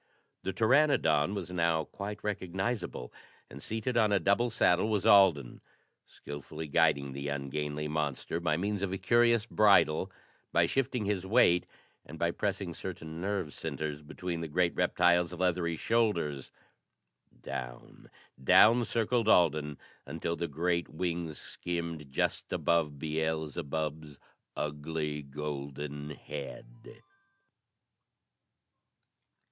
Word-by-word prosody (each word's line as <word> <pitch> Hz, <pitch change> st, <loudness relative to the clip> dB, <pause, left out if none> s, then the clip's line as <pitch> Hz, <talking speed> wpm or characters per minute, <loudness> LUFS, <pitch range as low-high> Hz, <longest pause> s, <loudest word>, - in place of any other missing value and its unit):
The 95 Hz, -, -2 dB
pteranodon 110 Hz, -, +3 dB
was 90 Hz, -3 st, -5 dB
now 85 Hz, -2 st, +1 dB
quite 105 Hz, +5 st, -7 dB
recognizable, 95 Hz, -, -3 dB, 0.4 s
and 70 Hz, -, -10 dB
seated 115 Hz, -, -2 dB
on 110 Hz, -3 st, +4 dB
a 100 Hz, -, +4 dB
double 100 Hz, +7 st, +2 dB
saddle 100 Hz, -2 st, +2 dB
was 105 Hz, -2 st, 0 dB
Alden, 95 Hz, -, +5 dB, 0.5 s
skillfully 75 Hz, +2 st, -8 dB
guiding 70 Hz, -3 st, +2 dB
the 70 Hz, +1 st, -5 dB
ungainly 75 Hz, +1 st, -3 dB
monster 75 Hz, +1 st, -2 dB
by 80 Hz, -3 st, 0 dB
means 100 Hz, +2 st, -2 dB
of 100 Hz, -2 st, -1 dB
a 95 Hz, -, -2 dB
curious 120 Hz, +2 st, +3 dB
bridle, 100 Hz, -5 st, +4 dB, 0.4 s
by -, -, +4 dB
shifting 130 Hz, -4 st, -1 dB
his 100 Hz, -2 st, -1 dB
weight 95 Hz, -5 st, +4 dB, 0.4 s
and 80 Hz, -, -10 dB
by 85 Hz, +1 st, +1 dB
pressing 100 Hz, -2 st, -2 dB
certain 80 Hz, -2 st, -7 dB
nerve 95 Hz, -5 st, -2 dB
centers 75 Hz, -1 st, -4 dB
between 85 Hz, +3 st, -5 dB
the 80 Hz, -, -3 dB
great 85 Hz, +3 st, +1 dB
reptile's 90 Hz, 0 st, +3 dB
leathery 90 Hz, -1 st, 0 dB
shoulders. 85 Hz, -, 0 dB, 0.9 s
Down, -, -, -7 dB, 0.3 s
down 115 Hz, -, +6 dB
circled 115 Hz, 0 st, 0 dB
Alden 75 Hz, -7 st, +3 dB, 0.3 s
until 85 Hz, -, -3 dB
the 85 Hz, -, -3 dB
great 85 Hz, +3 st, -1 dB
wings 85 Hz, -1 st, -3 dB
skimmed 85 Hz, -5 st, -5 dB
just -, -, -1 dB
above 80 Hz, -4 st, +1 dB
Beelzebub's 80 Hz, -1 st, -3 dB, 0.4 s
ugly 75 Hz, 0 st, -3 dB
golden 75 Hz, 0 st, -6 dB
head. 70 Hz, -, -9 dB
85 Hz, 115 wpm, -30 LUFS, 75-100 Hz, 0.9 s, down